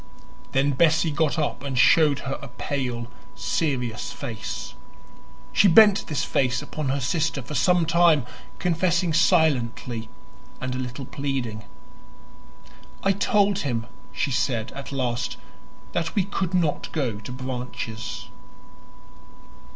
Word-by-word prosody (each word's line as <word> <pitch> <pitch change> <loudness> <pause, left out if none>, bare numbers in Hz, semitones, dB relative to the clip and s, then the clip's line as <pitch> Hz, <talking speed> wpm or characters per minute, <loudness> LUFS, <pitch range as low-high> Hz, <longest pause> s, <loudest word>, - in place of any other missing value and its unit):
Then 135 +2 +3
Bessie 160 +3 +3
got 155 +1 +1
up 150 -2 -1
and 135 -2 -4
showed 150 +2 +5
her 135 0 -4
a 140 - -7
pale, 125 -1 -3 0.3
serious 125 -8 -1
face. - - -6 0.8
She 205 - +6
bent 200 +2 +6
this 150 - -1
face 125 -3 +1
upon 150 -1 -4
her 140 +2 0
sister 140 0 0
for 125 - -8
some 180 +2 +3
time, 165 -4 +4 0.3
confessing 175 0 +1
silently 125 -9 +2 0.5
and 130 0 -3
a 130 - -3
little 130 +1 -5
pleading. 130 -7 -3 1.4
"I 195 - +4
told 200 0 +2
him," 120 -9 -2 0.3
she 140 - -1
said 120 -3 0
at 140 +1 -8
last, 125 -3 -2 0.5
"that 165 -1 -2
we 200 - +3
could 190 -1 -2
not 165 -5 0
go 125 -10 -1
to 120 - -8
Branches." 125 -3 -5
140 Hz, 125 wpm, -25 LUFS, 125-165 Hz, 1.4 s, She